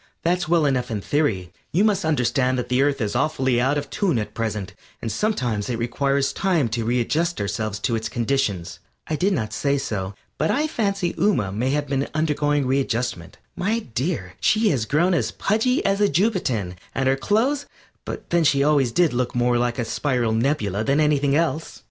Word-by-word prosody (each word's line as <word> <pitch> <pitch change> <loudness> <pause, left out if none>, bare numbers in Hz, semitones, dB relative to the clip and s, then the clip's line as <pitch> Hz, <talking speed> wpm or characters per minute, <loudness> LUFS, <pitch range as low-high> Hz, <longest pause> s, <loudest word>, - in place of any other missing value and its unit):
"That's 175 +1 +1
well 165 -2 +3
enough 130 -3 0
in 110 -3 -2
theory; 100 - -1 0.2
you 185 +6 +3
must 210 -6 +2
understand 130 -3 +1
that 125 - -3
the 125 +1 +2
Earth 140 0 +2
is 105 +1 -1
awfully 130 -3 +1
out 135 +3 +2
of 145 - -4
tune 185 - +1
at 105 - -3
present, 105 -4 -3 0.3
and 115 - -4
sometimes 125 - -1
it 120 - -1
requires 135 +4 0
time 170 -10 +1
to 115 +1 -2
readjust 125 +9 0
ourselves 105 +1 -2
to 120 - 0
its 110 0 -3
conditions." 115 -8 -1 0.3
I 155 - -2
did 185 +7 +1
not 110 - -2
say 140 +4 +1
so, 100 -7 -3 0.2
but 155 - +1
I 295 +4 +2
fancy 200 - -1
Ooma 160 - +1
may 120 +6 0
have 145 +1 0
been 140 0 -1
undergoing 145 -2 +1
readjustment. 125 -8 -1 0.2
My 215 +5 0 0.2
dear, 125 - -2
she 215 - +3
has 125 - 0
grown 170 +9 +2
as 125 -10 +1
pudgy 225 - 0
as 195 +1 +1
a 205 - +4
Jupitan, 140 - 0 0.2
and 135 -1 +1
her 135 - +4
clothes 230 - 0 0.4
but - - -7
then 170 -1 +3
she 140 -2 +3
always 140 -4 +3
did 170 0 +2
look 125 0 -1
more 120 0 +2
like 120 0 0
a 120 - -1
spiral 125 -2 0
nebula 110 -4 0
than 140 +6 +2
anything 145 -2 +2
else. 160 0 -1
135 Hz, 190 wpm, -23 LUFS, 115-165 Hz, 0.4 s, a